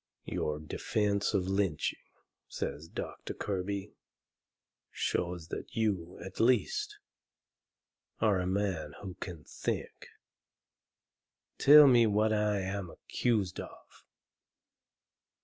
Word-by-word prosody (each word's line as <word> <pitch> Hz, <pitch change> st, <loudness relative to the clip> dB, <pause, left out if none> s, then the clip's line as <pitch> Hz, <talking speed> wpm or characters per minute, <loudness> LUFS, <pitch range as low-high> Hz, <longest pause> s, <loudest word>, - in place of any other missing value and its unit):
"Your 75 Hz, -1 st, -2 dB
defence 100 Hz, +7 st, -1 dB
of 95 Hz, -2 st, +1 dB
lynching," 95 Hz, -5 st, 0 dB, 0.5 s
says 75 Hz, +3 st, -4 dB
Doctor -, -, -6 dB
Kirby, 100 Hz, +1 st, -3 dB, 1.0 s
"shows 85 Hz, -2 st, -2 dB
that -, -, -6 dB
you, 95 Hz, -6 st, -1 dB
at 95 Hz, -, -9 dB
least, 120 Hz, -3 st, +2 dB, 1.2 s
are 105 Hz, -4 st, +3 dB
a 90 Hz, -, -1 dB
man 95 Hz, -6 st, -1 dB
who 95 Hz, -2 st, -5 dB
can 85 Hz, -5 st, -7 dB
think. -, -, -4 dB, 1.5 s
Tell 150 Hz, +1 st, +10 dB
me 120 Hz, -4 st, +6 dB
what 110 Hz, +1 st, +2 dB
I 105 Hz, -1 st, +1 dB
am 95 Hz, -1 st, -3 dB
accused 105 Hz, 0 st, -1 dB
of?" -, -, -9 dB
100 Hz, 95 wpm, -31 LUFS, 90-105 Hz, 1.5 s, Tell